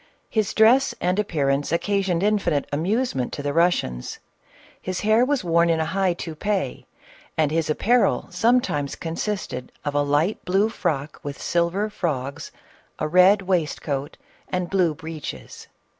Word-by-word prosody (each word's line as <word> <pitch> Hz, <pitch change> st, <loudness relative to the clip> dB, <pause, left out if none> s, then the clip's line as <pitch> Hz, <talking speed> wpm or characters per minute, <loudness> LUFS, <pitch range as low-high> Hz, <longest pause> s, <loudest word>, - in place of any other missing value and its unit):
His 215 Hz, -4 st, 0 dB
dress 245 Hz, +5 st, +5 dB
and 180 Hz, +3 st, 0 dB
appearance 145 Hz, -8 st, 0 dB
occasioned 190 Hz, 0 st, 0 dB
infinite 205 Hz, -9 st, +1 dB
amusement 170 Hz, -, -1 dB
to 145 Hz, -, -5 dB
the 145 Hz, 0 st, -1 dB
Russians. 165 Hz, -, 0 dB, 0.6 s
His 185 Hz, 0 st, -3 dB
hair 215 Hz, +3 st, +4 dB
was 270 Hz, -3 st, 0 dB
worn 170 Hz, 0 st, +3 dB
in 165 Hz, -1 st, +2 dB
a 160 Hz, -, +1 dB
high 185 Hz, +2 st, +1 dB
toupee, 180 Hz, +4 st, -3 dB, 0.5 s
and 155 Hz, -2 st, +2 dB
his 160 Hz, -1 st, 0 dB
apparel 235 Hz, +10 st, +2 dB
sometimes 200 Hz, -, +1 dB
consisted 165 Hz, -6 st, -4 dB
of 145 Hz, -, -1 dB
"a 145 Hz, -, +2 dB
light 145 Hz, +8 st, +1 dB
blue 195 Hz, +4 st, +2 dB
frock 155 Hz, -8 st, -3 dB
with 145 Hz, -1 st, -6 dB
silver 175 Hz, +5 st, 0 dB
frogs, 140 Hz, -9 st, -4 dB, 0.5 s
a 155 Hz, -, -1 dB
red 185 Hz, +4 st, +5 dB
waistcoat 155 Hz, -5 st, -2 dB, 0.3 s
and 180 Hz, -1 st, -2 dB
blue 180 Hz, -5 st, +2 dB
breeches." 155 Hz, -, -8 dB
170 Hz, 140 wpm, -23 LUFS, 150-200 Hz, 0.6 s, dress